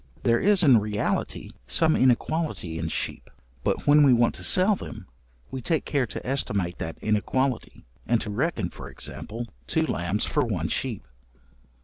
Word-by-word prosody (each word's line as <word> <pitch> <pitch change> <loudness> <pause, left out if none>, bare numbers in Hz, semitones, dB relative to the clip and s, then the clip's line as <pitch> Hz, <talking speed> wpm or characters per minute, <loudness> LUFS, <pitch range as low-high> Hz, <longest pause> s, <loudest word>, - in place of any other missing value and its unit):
There 115 0 +3
is 200 -1 +4
in 130 -7 +6
reality 105 0 -2 0.2
some 160 -1 +4
inequality 130 - 0
in - - -2
sheep, - - -4 0.3
but - - -1
when 150 +1 +6
we 140 -3 +6
want 120 0 +3
to - - -7
sell 190 +3 +5
them, - - -9 0.5
we 130 - -5
take 160 +6 -1
care 140 -4 0
to - - -7
estimate 100 -9 -1
that 80 - -5
inequality, 120 +4 -1 0.2
and 120 -1 +2
to 105 - -4
reckon 110 - -1
(for - - -9
example) 115 +2 -7 0.2
two - - +1
lambs 90 +4 -1
for 150 - +1
one 95 -8 -2
sheep. 120 - -2
120 Hz, 160 wpm, -25 LUFS, 105-145 Hz, 0.5 s, in